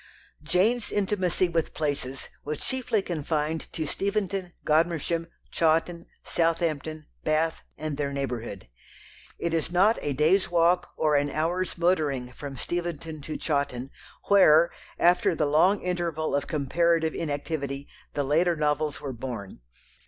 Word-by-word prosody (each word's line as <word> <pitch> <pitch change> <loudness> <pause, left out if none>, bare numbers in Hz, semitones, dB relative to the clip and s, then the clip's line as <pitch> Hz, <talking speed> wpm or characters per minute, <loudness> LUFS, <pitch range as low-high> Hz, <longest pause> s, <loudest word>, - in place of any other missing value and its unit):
Jane's 190 +9 +1
intimacy 190 -3 +1
with 165 -2 -1
places 140 -4 -2
was 150 +1 -4
chiefly 250 -6 0
confined 155 -1 -2
to 160 - -2
Steventon, 195 0 -2
Godmersham, 165 +1 +1 0.2
Chawton, 165 +1 +1 0.2
Southampton, 160 -2 -1 0.2
Bath, 155 +1 +1 0.2
and 155 -2 -4
their 145 -1 -1
neighbourhood. 120 - -4 0.7
It 170 -1 -2
is 165 0 0
not 195 +6 +4
a 145 - -1
day's 160 +8 +3
walk 175 +1 +3
or 155 -1 +2
an 145 0 +2
hour's 170 +6 -1
motoring 150 -8 +1
from 140 +1 -7
Steventon 165 -1 -4
to 155 +2 -5
Chawton, 140 -4 -1 0.3
where, 170 -4 +6 0.3
after 175 0 +4
the 155 - +1
long 165 +8 +3
interval 170 -4 -1
of 140 - -1
comparative 160 +2 +1
inactivity, 145 -2 -3 0.3
the 145 - +1
later 165 +5 +2
novels 150 -1 0
were 135 -2 -4
"born." 115 - -6
160 Hz, 130 wpm, -27 LUFS, 145-175 Hz, 0.7 s, where